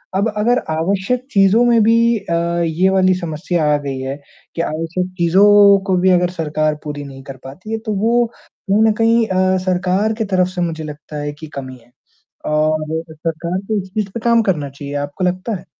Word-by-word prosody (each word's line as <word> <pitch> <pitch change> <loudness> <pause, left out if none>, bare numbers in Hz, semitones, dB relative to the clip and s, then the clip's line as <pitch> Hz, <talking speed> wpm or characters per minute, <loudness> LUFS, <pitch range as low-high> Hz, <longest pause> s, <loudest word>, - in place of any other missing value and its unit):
अब 200 +3 +2
अगर 235 +4 +2 0.2
आवश्यक 195 +9 -1
चीज़ों 195 +4 +4
में 235 -2 +4
भी 230 +1 +3
अ, 180 - -5 0.3
ये 170 +4 +1
वाली 190 -1 +3
समस्या 170 -1 -2
आ - - +4
गई 140 -2 -5
है 135 +1 -4 0.4
कि, 165 - -1
आवश्यक 165 +3 -3
चीज़ों 175 +3 +3 0.4
को 190 - +2
भी 185 +1 +3
अगर 180 -1 +3
सरकार 155 -1 0
पूरी 145 -1 -5
नहीं 135 -1 -11
कर 135 0 -9
पाती 175 +11 -10
है 225 - -1
तो 215 - -1
वो 235 +3 +2 0.4
कहीं 205 +2 +3
न - - +4
कहीं 230 0 +3
अ, 185 -1 +2
सरकार 185 +4 +1
की 225 - 0
तरफ 185 -2 +1
से 185 -1 -5
मुझे 165 -2 -2
लगता 150 0 -8
है 145 0 -3
कि 155 +2 -10
कमी 130 -2 -7
है 120 0 -24 0.6
और 155 +1 0
सरकार 165 +2 -3
को 215 -2 0
इस 190 - -12
चीज़ 210 -2 -2
पे - - -4
काम 235 -1 +4
करना 155 -9 -1
चाहिए, 140 +1 -8
आपको 145 +5 -4
लगता 185 +5 -2
है? 180 0 -9
180 Hz, 200 wpm, -18 LUFS, 155-200 Hz, 0.6 s, चीज़ों